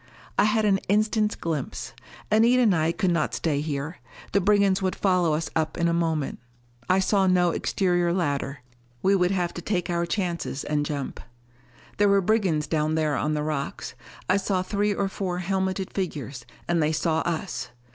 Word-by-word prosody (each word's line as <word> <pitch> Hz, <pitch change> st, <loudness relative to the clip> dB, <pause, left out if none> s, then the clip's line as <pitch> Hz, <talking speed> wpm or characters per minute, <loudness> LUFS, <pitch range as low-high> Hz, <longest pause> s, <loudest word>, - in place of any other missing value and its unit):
I -, -, +4 dB
had 215 Hz, 0 st, +2 dB
an 195 Hz, -2 st, +3 dB
instant's 215 Hz, +1 st, +2 dB
glimpse. 155 Hz, -5 st, -4 dB, 0.4 s
Anita 235 Hz, +4 st, +5 dB
and 210 Hz, -6 st, +4 dB
I 160 Hz, 0 st, +2 dB
could 185 Hz, +1 st, 0 dB
not 170 Hz, -3 st, 0 dB
stay 145 Hz, -4 st, 0 dB
here. 150 Hz, +2 st, -4 dB, 0.3 s
The 200 Hz, -, +3 dB
brigands 200 Hz, -1 st, +3 dB
would 185 Hz, -1 st, 0 dB
follow 180 Hz, -5 st, +2 dB
us 160 Hz, +2 st, -3 dB
up 160 Hz, -1 st, 0 dB
in 170 Hz, -, +2 dB
a 170 Hz, -, +1 dB
moment. 160 Hz, -4 st, -1 dB, 0.5 s
I 185 Hz, -, +4 dB
saw 190 Hz, 0 st, +2 dB
no 180 Hz, -1 st, +3 dB
exterior 175 Hz, -1 st, +1 dB
ladder. 145 Hz, -6 st, -1 dB, 0.4 s
We 195 Hz, +1 st, +4 dB
would 180 Hz, -2 st, +2 dB
have 180 Hz, -3 st, -1 dB
to 175 Hz, -, -6 dB
take 180 Hz, -1 st, -1 dB
our 170 Hz, 0 st, 0 dB
chances 170 Hz, -7 st, -2 dB
and 145 Hz, -1 st, -1 dB
jump. 140 Hz, -3 st, -4 dB, 0.8 s
There 205 Hz, 0 st, +4 dB
were 200 Hz, 0 st, +5 dB
brigands 190 Hz, -6 st, +1 dB
down 155 Hz, 0 st, 0 dB
there 155 Hz, -2 st, +1 dB
on 150 Hz, +2 st, 0 dB
the 150 Hz, -, -1 dB
rocks. 150 Hz, -2 st, -3 dB, 0.3 s
I 185 Hz, -, +3 dB
saw 190 Hz, -1 st, 0 dB
three 205 Hz, +2 st, 0 dB
or 200 Hz, 0 st, 0 dB
four 190 Hz, -2 st, -3 dB
helmeted 190 Hz, +1 st, -2 dB
figures, 145 Hz, -9 st, -4 dB, 0.2 s
and 170 Hz, -1 st, +2 dB
they 155 Hz, +1 st, +1 dB
saw 160 Hz, +1 st, +1 dB
us! 160 Hz, -8 st, -3 dB
175 Hz, 180 wpm, -25 LUFS, 155-195 Hz, 0.8 s, Anita